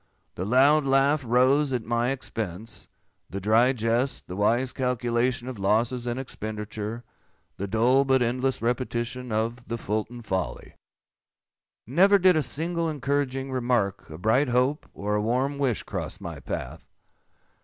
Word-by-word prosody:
The 90 - -4
loud 140 +7 +5
laugh 135 +2 +3
rose 130 +4 +3
at 120 -3 -2
my 120 +1 0
expense; 110 -5 -5 0.4
the 100 - -4
dry 110 +6 +4
jest, 120 +2 -1
the 90 - -7
wise 120 +6 +1
calculation 125 0 0
of 130 -5 -6
losses 115 +5 +1
and 120 +1 -2
expenditure; 110 -2 -5 0.5
the 100 - -3
dull 120 +6 +3
but 130 -2 +3
endless 125 +1 -1
repetition 125 0 -2
of 115 +3 -2
"the 115 +2 -3
Fulton 115 +3 -3
folly." 95 -4 -3 1.1
Never 190 - +5
did 185 -2 +5
a 155 - +3
single 165 +5 -2
encouraging 140 -2 -1
remark, 120 -7 0
a 80 - -8
bright 110 - +2
hope, 125 +5 +1
or 105 +1 -2
a 105 - +1
warm 130 +6 0
wish, 130 -6 0
cross - - -5
my - - -7
path. - - -6
125 Hz, 145 wpm, -26 LUFS, 110-135 Hz, 1.1 s, loud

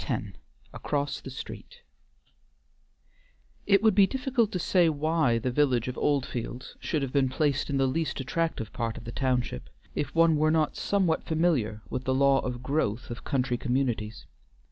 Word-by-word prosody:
X - - +1 0.5
ACROSS 145 -1 -2
THE - - -8
STREET 475 - -9 1.9
It 200 0 +4
would 220 -2 +5
be 195 0 +6
difficult 260 -4 0
to - - -1
say 175 -1 +3
why 155 -4 +1
the 125 +2 -1
village 125 -3 +2
of 125 - -3
Oldfields 130 -3 -2
should 155 -4 -1
have 130 - -4
been 135 -2 +3
placed 145 +1 0
in 140 - 0
the 135 - +3
least 155 +4 -1
attractive 135 -4 -2
part 115 -2 -3
of - - -9
the 120 - -6
township, 125 - -1 0.2
if 145 +1 -3
one 165 -1 +5
were 155 +1 +3
not 155 -1 +1
somewhat 185 -5 +1
familiar 150 -11 0
with 130 - -3
the 130 - +1
law 140 0 +4
of 125 -1 -4
growth 130 -5 -1
of 120 - -7
country 125 -2 0
communities. 120 -4 -2
140 Hz, 165 wpm, -28 LUFS, 125-160 Hz, 1.9 s, be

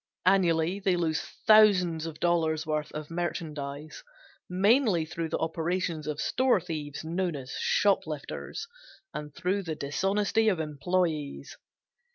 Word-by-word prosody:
Annually 180 -1 +3
they 190 -2 +2
lose 165 -2 0 0.2
thousands 185 -7 +5
of 160 -2 -8
dollars 160 -2 +1
worth 150 -1 -2
of 150 +1 -6
merchandise 155 -4 -4 0.5
mainly 200 - +3
through 165 0 -4
the - - -1
operations 165 0 -2
of 150 -1 -3
store 255 -5 +2
thieves 155 -5 -5
known 175 0 -1
as 135 -2 -7
shoplifters, 160 - 0 0.5
and 150 0 -6
through 185 +3 0
the 165 -4 -4
dishonesty 195 +9 +1
of 185 -5 0
employes. 155 -1 -2
165 Hz, 125 wpm, -28 LUFS, 155-185 Hz, 0.5 s, thousands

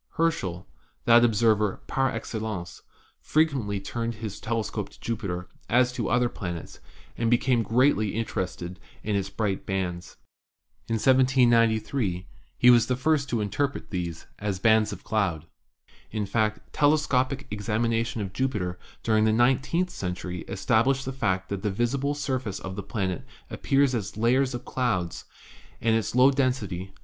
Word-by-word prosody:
Herschel, 95 - -1 0.4
that 120 0 +7
observer 110 -2 +2
'par 135 0 +1
excellence,' 110 -5 -5 0.4
frequently 135 -11 +1
turned 115 +4 -3
his 110 -2 -6
telescope 110 -1 -2
to - - -19
Jupiter 100 -6 -3 0.2
as 125 +1 +4
to - - -2
other 125 0 +3
planets, 85 -7 -6 0.4
and 115 -1 0
became 120 0 +3
greatly 115 -2 +2
interested 95 -4 -3 0.2
in 105 -1 -1
its 100 -1 -1
bright 100 -3 -2
bands. 90 -3 -3 0.7
In 115 - +1
1793 120 -5 +3 0.3
he 125 - +6
was 120 -2 +5
the 125 - +1
first 140 +2 +1
to 115 -3 0
interpret 140 +8 -2
these 85 -4 -4
as 100 -2 -2
bands 110 +2 +3
of - - -8
clouds. 95 -8 -1 0.6
In 105 -1 -2
fact, 110 +1 -1
telescopic 140 -2 +2
examination 115 +2 -1
of 95 -1 -6
Jupiter 100 -9 -2 0.2
during 110 -1 +3
the 110 - +4
nine 120 +4 +4
teenth 175 +6 -1
century 90 - -4
established 120 +7 +1
the 135 - -3
fact 95 -8 -1
that 100 -1 -3
the 105 - 0
visible 130 +7 0
surface 130 -8 -2
of 95 0 -6
the 100 - -4
planet 95 -2 -3 0.3
appears 135 -1 +2
as 110 -3 -3
layers 125 +3 +2
of 120 +1 -7
clouds, 100 -10 -1 0.5
and 115 0 +2
its 115 0 -1
low 130 +2 +7
den 130 -2 +2
sity, 95 -6 -6
1. 95 - -23
115 Hz, 150 wpm, -26 LUFS, 100-125 Hz, 0.7 s, that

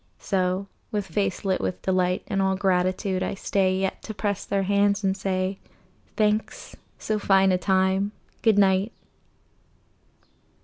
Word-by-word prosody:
So, 185 0 -1 0.2
with 205 -2 -2
face 195 +2 -2
lit 190 -1 +1
with 185 - -3
delight 185 -1 +1
And 195 - 0
all 190 0 +2
gratitude, 185 0 0
I - - -2
stay 190 -1 +1
Yet 190 0 -2
to 220 - -7
press 205 -1 -2
their 195 -1 0
hands 200 +1 +2
and 190 0 +1
say, 190 0 -2 0.6
"Thanks. 215 0 -1 0.2
So 215 -1 -2
fine 195 -1 +4
a 180 - +2
time! 190 +1 +1 0.3
Good 220 -3 +3
night. 195 +1 +3
195 Hz, 140 wpm, -25 LUFS, 185-200 Hz, 0.6 s, fine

